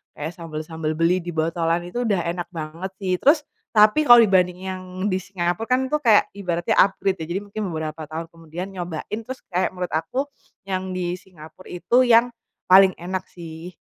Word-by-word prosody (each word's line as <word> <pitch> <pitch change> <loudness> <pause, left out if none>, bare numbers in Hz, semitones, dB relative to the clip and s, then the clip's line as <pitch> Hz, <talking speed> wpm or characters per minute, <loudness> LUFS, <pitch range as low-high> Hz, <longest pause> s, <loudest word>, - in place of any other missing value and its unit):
kayak 155 +3 -5
sambal-sambal 155 -1 -4
beli 165 +3 +2
di 175 -1 -7
botolan 165 +1 0
itu 240 +8 -3
udah 195 -5 +1
enak 175 0 -5
banget 165 +2 -6
sih 190 -2 -1
terus 295 +1 +4 0.3
tapi 215 +7 +5
kalo 240 -4 +9
dibanding 185 -3 +3
yang 185 0 -5 0.2
di 190 - 0
Singapura 185 +1 -2
kan 255 +2 +2
itu 300 - 0
kayak 220 -4 +5
ibaratnya 175 -4 -1
upgrade 195 -2 +2
ya - - -4
jadi 190 - -1
mungkin 205 +1 -6
beberapa 160 0 -4
tahun 160 +2 -6
kemudian 165 +2 -8
nyobain 180 +1 -5
terus 260 +3 -7
kayak 185 0 0
menurut 180 -2 -5
aku, 260 - -2 0.4
yang 190 -1 -3
di 180 -1 -2
Singapura 180 -2 -14
itu 240 +8 +2
yang, 240 0 +4 0.3
paling 190 +1 +7
enak 185 +2 -3
sih. 170 +1 -9
180 Hz, 175 wpm, -23 LUFS, 165-200 Hz, 0.4 s, kalo